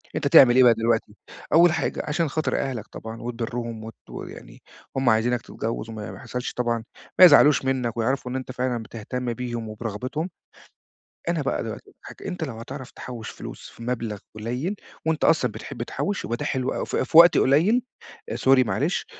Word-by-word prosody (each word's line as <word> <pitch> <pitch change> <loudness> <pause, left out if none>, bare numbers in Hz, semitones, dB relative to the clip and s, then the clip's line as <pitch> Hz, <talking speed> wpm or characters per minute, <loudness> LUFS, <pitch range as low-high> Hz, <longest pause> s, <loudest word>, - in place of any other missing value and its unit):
أنت 145 - 0
تعمل 130 -3 +8
إيه 130 - +7
بقى 120 -2 +7
دلوقتي. 115 -2 0 0.4
أول 170 +2 +7
حاجة 160 -3 -1
عشان 155 +1 0
خاطر 155 +3 -1
أهلك 130 -6 -3
طبعًا 110 +1 -8
وتبرّهم 115 -1 -4
وت 110 0 -9
ويعني - - -10 0.4
هُم 135 -2 +3
عايزينك 120 +2 +2
تتجوز، 115 +1 -5
وما 105 -4 -6
ما 95 - -9
يحصلش 125 +5 -5
طبعًا 120 -2 -1 0.4
ما 185 - +12
يزعلوش 145 -4 +6
منك، 125 -3 -1
ويعرفوا 125 +2 -1
إن 130 - -4
أنت 130 -1 -4
فعلًا 125 -2 -2
بتهتم 120 +3 -4
بيهم 120 -2 -5
وبرغبتهم، 120 - -4 1.0
أنا - - 0
بقى - - -1
دلوقتي - - -7
هاج - - -9
أنت 180 -3 -4
لو 135 - -4
هتعرف 130 +2 -8
تحوش 120 -4 -8
فلوس - - -9
في 115 - -12
مبلغ 115 -3 -3 0.2
قليل، 125 - -3 0.3
وأنت 160 -1 0
أصلًا 125 -8 +3
بتحب 110 +2 -6
تحوش 200 +9 -3
يبقى 120 - -2
ده 145 - -4
حلو 130 -3 -1
أوي، - - -3
ف - - -4
في 135 - +2
وقت 170 +1 +9
قليل، 175 - +4 0.5
آآ، - - -3
sorry 130 -1 +4
معلش، 135 - -1
125 Hz, 180 wpm, -24 LUFS, 115-140 Hz, 1.0 s, ما